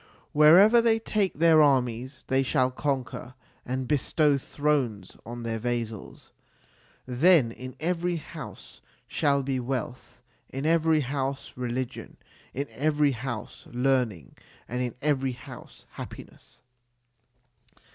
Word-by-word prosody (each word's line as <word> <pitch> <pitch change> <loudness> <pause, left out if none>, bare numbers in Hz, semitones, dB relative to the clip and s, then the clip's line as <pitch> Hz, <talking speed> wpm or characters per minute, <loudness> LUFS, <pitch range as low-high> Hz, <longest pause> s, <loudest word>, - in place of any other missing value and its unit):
Wherever 185 +10 +7
they 230 -1 +3
take 210 -3 -1
their 160 -1 +5
armies 130 -2 +1
they 130 0 +2
shall 130 -1 +1
conquer 130 -2 -3 0.3
and 130 0 -2
bestow 150 +1 +2
thrones 130 -10 -1
on 120 0 -6
their 115 -1 -2
vassals. 115 -3 -5 0.7
Then 130 0 +4
in 130 +2 -9
every 175 +1 -1
house 160 - -9 0.3
shall 140 -3 +1
be 130 -1 -1
wealth, 125 -1 -5 0.3
in 135 +2 -5
every 160 -1 +3
house 135 0 -3
religion, 125 0 -4 0.3
in 140 +2 -3
every 150 0 +2
house 120 -3 -6
learning, 120 - 0 0.3
and 125 +2 -3
in 125 -2 -3
every 135 -3 +1
house - - -12
happiness. - - -11
135 Hz, 115 wpm, -27 LUFS, 125-150 Hz, 0.7 s, Wherever